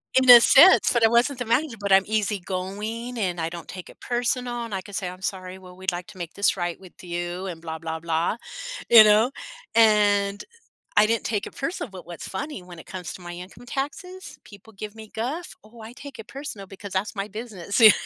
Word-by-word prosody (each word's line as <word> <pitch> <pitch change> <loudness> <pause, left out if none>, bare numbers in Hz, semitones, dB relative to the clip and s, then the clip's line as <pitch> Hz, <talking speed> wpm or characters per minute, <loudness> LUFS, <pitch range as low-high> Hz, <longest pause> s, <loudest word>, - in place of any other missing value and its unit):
In 260 0 +5
the 245 -1 +11
sense, 340 +10 +7
but 235 -2 +4
I - - +5
wasn't 240 +4 +2
the 245 - -2
manager, 250 +3 0
but 200 -1 -3
I'm 190 0 +6
easygoing, 210 +3 -3
and 180 -4 -1
I 160 - -1
don't 170 0 -9
take 185 -1 -9
it - - -16
personal, 240 0 -2
and 225 - -8
I 190 - -2
can 205 - -13
say, 180 0 -3
"I'm 185 +1 -11
sorry, 185 -1 -4
well, 180 -1 -14
we'd 190 +1 -2
like 175 0 -6
to 190 - -13
make 170 -2 -6
this 200 0 +1
right 175 -1 -3
with 185 -1 -15
you," 175 +1 -4
and 170 -4 -6
blah 160 -1 -5
blah 160 0 -5
blah, 165 +5 -1 0.5
you 230 -2 +10
know, 215 +3 +5 0.4
and 205 -3 +3 0.5
I 210 - +6
didn't 230 0 0
take 210 -3 -1
it - - -13
personal, 290 -2 -4
but 190 -2 -11
what's 170 0 -8
funny 285 +2 -5
when 180 -1 -12
it - - -13
comes 185 -2 -6
to - - -11
my 175 0 -8
income 185 +7 -11
taxes, 360 +9 -6
people 205 +1 -15
give 210 +2 -8
me 220 -1 -12
guff, 280 +10 -4
oh, 225 +2 -15
I 220 +2 -10
take 275 -1 -11
it 225 - -9
personal 270 -8 -8
because 195 +1 -10
that's 195 +3 -2
my 200 0 -3
business. 210 -2 -4
You 220 -2 +10
205 Hz, 225 wpm, -24 LUFS, 185-235 Hz, 0.5 s, the